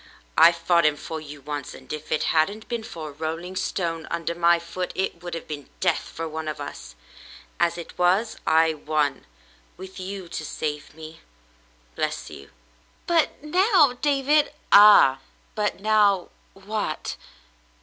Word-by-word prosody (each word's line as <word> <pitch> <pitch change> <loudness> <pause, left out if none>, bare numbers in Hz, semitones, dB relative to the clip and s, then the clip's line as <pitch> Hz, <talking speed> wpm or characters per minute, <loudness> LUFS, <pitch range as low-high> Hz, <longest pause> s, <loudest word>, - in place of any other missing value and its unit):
I 170 - +9
fought 170 0 +2
him 155 -1 +3
for 160 +1 -6
you 145 -1 -10
once, 145 0 -6
and - - -9
if 155 0 -8
it - - +1
hadn't 200 +7 +1
been 235 -2 -3
for 160 -7 -7
a - - -9
rolling 165 +5 -5
stone 165 -4 -2
under 170 0 -2
my 170 0 +4
foot, 170 +2 -5
it 190 -2 -2
would 175 -1 -6
have 165 - -7
been 145 -3 -7
death - - 0
for 165 0 -5
one 160 0 -5
of 150 -1 -4
us. 145 - -8 0.6
As 170 0 +2
it 170 - -10
was, 190 +6 +2
I 160 0 +4
won 150 - -1 0.2
— - - -32
with 190 +1 -10
you 190 0 -6
to 160 - -5
save 150 -1 -5
me 160 0 -11 0.4
— - - -34
bless - - -3
you." 70 0 -11 0.6
"Butnow, 330 - +2
David— 290 +1 +2 0.2
" - - -35
"Ah, 200 -10 +8 0.3
but 210 -2 -2
now 205 -3 +3
— - - -36
what 195 -4 -4
170 Hz, 165 wpm, -24 LUFS, 155-200 Hz, 0.6 s, I